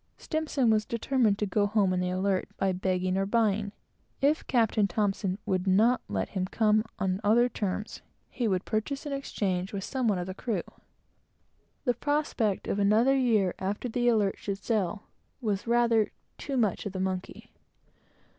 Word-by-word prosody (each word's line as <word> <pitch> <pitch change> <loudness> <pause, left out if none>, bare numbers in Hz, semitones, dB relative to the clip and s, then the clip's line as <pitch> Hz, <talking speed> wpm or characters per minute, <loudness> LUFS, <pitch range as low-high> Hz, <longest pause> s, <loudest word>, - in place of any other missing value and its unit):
S 315 -2 -3
was 220 -5 +4
determined 230 -2 +1
to 210 - 0
go 205 +1 +1
home 200 -3 +2
on 180 - 0
the 180 0 0
Alert, 185 +1 0
by 195 -1 +1
begging 185 0 0
or 195 - 0
buying; 210 -2 +1 0.5
if 290 +3 +1
Captain 225 -4 +2
T 175 - -15 0.5
would 190 -2 -1
not 220 +7 +4
let 95 -2 -2
him 185 -2 -2
come 215 +1 +2
on 190 -1 -1
other 235 +4 +4
terms, 210 -2 -4 0.3
he 240 - -1
would 185 -3 0
purchase 270 +7 -2
an 290 - -3
exchange 195 -9 -2
with 195 -1 -3
some 260 0 -1
one 205 -3 +2
of 180 - -3
the 185 - -5
crew. 200 -2 -2 1.2
The 245 - +3
prospect 265 -6 -1
of 205 - -1
another 220 +7 +4
year 220 -8 +2
after 200 +6 -2
the 240 +1 0
Alert 210 -5 +2
should 200 -1 -3
sail, 205 -1 -1 0.4
was 210 -4 -2
rather 235 -2 +3 0.3
"too 275 -2 -3
much 215 -3 0
of 200 - -7
the 190 - -4
monkey." 185 0 -4
210 Hz, 170 wpm, -28 LUFS, 190-235 Hz, 1.2 s, was